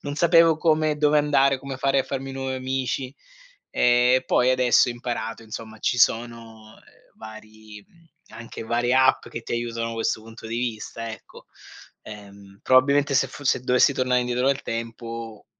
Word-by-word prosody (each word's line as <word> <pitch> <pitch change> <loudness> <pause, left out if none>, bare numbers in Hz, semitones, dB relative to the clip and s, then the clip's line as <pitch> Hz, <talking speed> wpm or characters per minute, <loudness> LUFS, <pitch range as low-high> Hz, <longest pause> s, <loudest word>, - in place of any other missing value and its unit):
non 145 0 -5
sapevo 165 0 +4
come 155 -1 +1
dove 150 0 +3
andare, 140 -2 +2
come 135 0 -7
fare 135 +1 +1
a - - -5
farmi 135 0 -5
nuovi 135 0 -4
amici 130 0 -3 0.6
e 125 +1 +3
poi 125 +1 +2
adesso 125 -2 +3
ho - - -2
imparato, 115 -2 -5
insomma, 110 0 -9
ci 125 - -1
sono 115 -2 -1 0.4
vari, 110 -1 -13
mhmm, 170 -1 -26 0.3
anche 115 0 -9
varie 120 +2 0
app 130 0 +3
che 115 - -7
ti - - -13
aiutano 115 -1 -3
da 115 - -6
questo 110 -1 -2
punto 115 0 -12
di 115 - -4
vista 115 -1 -5
ecco, 110 - -13 0.6
ehm, 100 -2 -13
probabilmente 140 +2 +3
se 135 0 +2
foss 135 +1 -5
se - - -1
dovessi 125 +2 +3
tornare 125 -1 +1
indietro 125 +1 -1
nel 135 0 +1
tempo 115 -1 -7
125 Hz, 165 wpm, -23 LUFS, 115-135 Hz, 0.6 s, sapevo